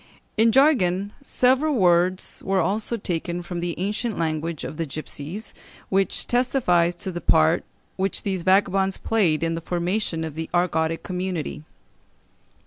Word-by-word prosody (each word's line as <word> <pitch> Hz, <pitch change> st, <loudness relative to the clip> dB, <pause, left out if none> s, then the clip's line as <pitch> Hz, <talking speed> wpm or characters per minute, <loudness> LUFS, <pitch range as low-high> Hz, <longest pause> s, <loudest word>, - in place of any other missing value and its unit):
In 225 Hz, +1 st, +4 dB
jargon 205 Hz, -, +3 dB
several 270 Hz, +3 st, +2 dB
words 180 Hz, -2 st, +2 dB
were 195 Hz, 0 st, +1 dB
also 210 Hz, +6 st, 0 dB
taken 175 Hz, -2 st, -3 dB
from 175 Hz, 0 st, -5 dB
the 170 Hz, -1 st, -3 dB
ancient 210 Hz, +3 st, -2 dB
language 160 Hz, -1 st, -2 dB
of 155 Hz, -, -6 dB
the 165 Hz, -, -2 dB
gipsies, 155 Hz, +7 st, -6 dB, 0.4 s
which 195 Hz, 0 st, 0 dB
testifies 230 Hz, -9 st, +2 dB
to 185 Hz, +2 st, -3 dB
the 175 Hz, -1 st, -5 dB
part 160 Hz, +1 st, +3 dB, 0.3 s
which 195 Hz, +1 st, -2 dB
these 190 Hz, -3 st, -1 dB
vagabonds 190 Hz, +1 st, +2 dB
played 175 Hz, -9 st, +1 dB
in 165 Hz, 0 st, 0 dB
the 165 Hz, -, -3 dB
formation 175 Hz, 0 st, -1 dB
of 160 Hz, -2 st, -5 dB
the 160 Hz, +1 st, -5 dB
Argotic 165 Hz, -2 st, +1 dB
community. 180 Hz, -5 st, -3 dB
180 Hz, 140 wpm, -24 LUFS, 165-205 Hz, 0.4 s, In